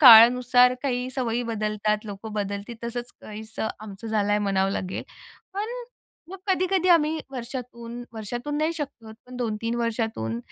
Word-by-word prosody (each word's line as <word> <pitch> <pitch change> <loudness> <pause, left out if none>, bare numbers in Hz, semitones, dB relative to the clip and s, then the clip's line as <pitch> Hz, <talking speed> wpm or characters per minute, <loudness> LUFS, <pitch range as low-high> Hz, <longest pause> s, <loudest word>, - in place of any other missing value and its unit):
काळानुसार 250 0 +9
काही 250 -2 0
सवयी 245 -2 0
बदलतात, 215 0 0
लोकं 210 +1 -7
बदलते, 205 +2 -3
तसंच 240 +1 -4
काहीसं 220 +1 -5
आमचं 215 +1 -8
झालंय 210 -1 +2
म्हणावं 195 -1 +2
लागेल. 185 -1 -3 0.5
पण 420 +3 -2 0.6
मग 385 - -7
कधी-कधी 370 -1 +2
आम्ही 320 -2 +5
वर्षातून 240 -2 -6
वर्षातून 240 +6 -4
नाही 315 +2 +2
शक्य 280 -7 -6
होत, 220 - -9
पण 250 0 -9
2-3 230 -1 -1
वर्षातून, 225 - -1
235 Hz, 135 wpm, -26 LUFS, 215-255 Hz, 0.6 s, काळानुसार